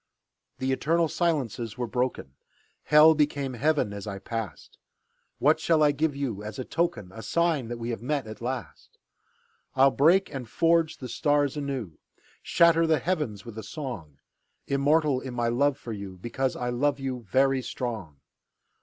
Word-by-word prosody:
The 130 0 -1
eternal 165 +5 +2
silences 135 - -1
were 125 - -1
broken; 125 - -2 0.5
Hell 155 +1 +7
became 145 -3 0
Heaven 130 -3 +1
as 100 0 -7
I 100 -1 -4
passed. 105 -3 -6 0.6
What 155 +3 +3
shall 160 -1 +3
I 150 - +5
give 145 0 0
you 130 -8 -3
as 105 +4 -7
a 130 - -4
token, 115 - -2
A 115 - -8
sign 160 +1 0
that 120 +1 -5
we 115 +1 -4
have 115 - -5
met, 140 +1 -1
at 110 +1 -9
last? 125 -2 -6 0.8
I'll 135 +1 +6
break 175 +8 +3
and 125 -4 -6
forge 165 +1 +2
the 130 - -7
stars 145 +1 +1
anew, 135 - -4 0.4
Shatter 165 -1 +4
the 160 -1 +4
heavens 150 - -2
with 115 -2 -8
a - - -7
song; 105 - -7 0.5
Immortal 145 0 +2
in 130 -2 -7
my 120 -1 0
love 140 +4 +2
for 120 -5 -7
you, 100 -3 -7
Because 130 +6 -2
I 125 0 -2
love 140 +3 0
you, 130 -4 -5
very 135 0 +3
strong. 105 - -5
130 Hz, 165 wpm, -27 LUFS, 115-150 Hz, 0.8 s, Hell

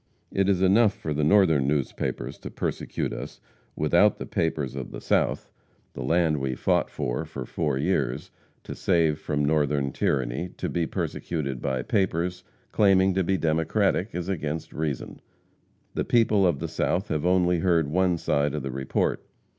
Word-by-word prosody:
It 95 0 +1
is 95 -1 +2
enough 100 +3 +4
for 75 - -4
the 75 +1 0
northern 80 -6 +4 0.3
papers 65 +4 -4
to - - -7
persecute - - -3
us - - -7 0.4
without 85 +7 +3
the - - -6
papers 75 -5 -1
of 65 -3 -5
the - - -7
south; - - 0 0.4
the - - -7
land 80 +3 +2
we 65 -1 -2
fought - - +1
for - - -3
for 75 -5 -7
four 75 -2 -1
years, 65 -2 -1 0.3
to - - -7
save 80 -3 +1
from 75 -1 -1
Northern 75 -2 +1
tyranny, 65 +6 -1
to - - -3
be 85 -2 -1
persecuted 70 -6 -3
by 65 -2 -1
papers 90 - 0 0.3
claiming 95 -2 +4
to 95 +1 +1
be 95 +2 +1
Democratic, 85 +5 0
is 90 -1 -3
against 80 -4 -3
reason. 75 -4 -4 0.7
The - - -1
people 110 -5 +3
of 85 - +1
the - - -4
south 95 +4 -1
have 75 -2 -1
only 90 -1 +3
heard 85 -4 +2
one 90 +3 +2
side 70 -2 0
of 75 - -3
the 70 - -3
report. 65 +1 -1
80 Hz, 165 wpm, -26 LUFS, 70-95 Hz, 0.7 s, enough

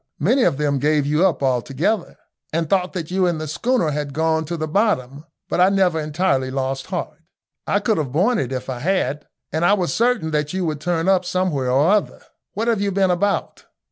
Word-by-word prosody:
Many 235 - +2
of 135 - +1
them 145 -2 0
gave 150 +1 +2
you 150 +6 +3
up 155 -6 -2
altogether, 135 - 0 0.4
and 165 0 -1
thought 185 +1 0
that 175 -3 -5
you 185 0 +2
and 170 -3 -1
the 155 - -4
schooner 170 - 0
had 145 -1 -4
gone 160 0 +1
to 170 +2 -4
the 155 0 -3
bottom, 150 - 0 0.2
but - - -2
I 185 - +6
never 190 -4 +2
entirely 150 -4 0
lost 135 0 -3
heart. 170 -4 -5 0.5
I 200 - +2
couldn't 205 -9 +1
have 130 - -10
borne 200 - +2
it 130 -2 -2
if 130 -1 -4
I 130 -2 -4
had, 150 -2 -1 0.2
and 160 +2 -1
I 195 - +5
was 185 -4 0
certain 235 -9 +1
that 150 0 -1
you 185 -1 -1
would 155 -2 -3
turn 170 0 -1
up 190 -1 +3
somewhere 175 -8 -1
or 140 +8 +3
other. 210 -1 0 0.4
What 225 +3 -1
have 225 -4 +1
you 200 0 0
been 190 -1 +2
about?" 200 +3 -1
160 Hz, 215 wpm, -21 LUFS, 145-190 Hz, 0.5 s, I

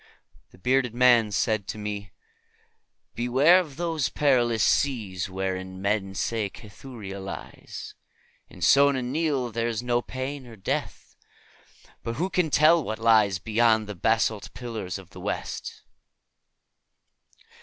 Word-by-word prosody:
But - - -49
the - - -18
bearded 125 +3 +1
man 120 -3 +5
said 105 0 0
to - - -5
me, 105 -2 -5 1.0
"Beware 135 +9 +4
of 155 -7 -5
those 165 -4 -1
perilous 120 -6 +2
seas 105 -10 0
wherein 95 0 -4
men 100 -1 -1
say 110 -2 -1
Cathuria 105 -2 -10
lies. 95 0 -8 0.6
In 90 - -9
Sona 140 +5 +5
Nyl 135 -2 -1
there 115 +1 0
is 115 0 -2
no 120 0 +1
pain 130 +2 -5
nor 115 -2 -12
death, 95 - -4 0.9
but 115 - -4
who 180 +7 -2
can 180 -3 +1
tell 155 +2 +5
what 110 -3 -4
lies 110 -4 +4
beyond 110 +1 +2
the 105 - -6
basalt 110 +2 0
pillars 110 -8 -5
of - - -14
the - - -11
West?" - - -5
115 Hz, 135 wpm, -26 LUFS, 105-130 Hz, 1.0 s, man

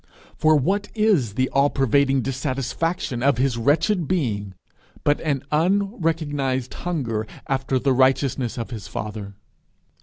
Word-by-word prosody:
For 155 0 +4
what 195 +9 +1
is 190 - +2
the 130 +1 +2
all 140 +1 +3
pervading 135 0 +2
dissatisfaction 135 +1 -2
of 140 -1 +3
his 130 -1 +1
wretched 160 - +2
being 105 - -1 0.5
but 145 0 +2
an 140 -4 -1
unrecognized 155 - 0
hunger 120 -11 -3 0.2
after 135 0 0
the 135 +1 +2
righteousness 130 -1 +2
of 115 +1 -5
his 110 -6 -6
father. 105 -2 -6
135 Hz, 125 wpm, -23 LUFS, 125-155 Hz, 0.5 s, For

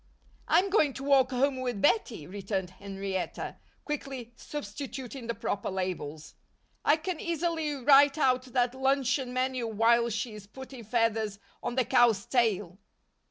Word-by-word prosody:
"I'm 370 +4 +3
going 305 -9 +3
to 270 - -7
walk 275 -2 +4
home 260 +1 +1
with 245 -5 -2
Bettie," 245 - +1
returned 190 0 -4
Henrietta, 195 -1 -5 0.3
quickly 270 -5 -5
substituting 270 -3 -6
the 235 - -2
proper 200 - -2
labels. 180 -5 -4 0.5
"I 300 - +4
can 330 +1 -4
easily 330 -2 -1
write 280 +2 +5
out 255 -3 +2
that 250 -1 0
luncheon 265 -1 +1
menu 255 -1 -1
while 230 +2 +3
she's 215 -2 -4
putting 260 +1 -10
feathers 220 -2 0 0.2
on 240 - -3
the 255 -2 +2
cow's 230 -3 +4
tail." 210 -7 0
245 Hz, 135 wpm, -29 LUFS, 215-275 Hz, 0.5 s, write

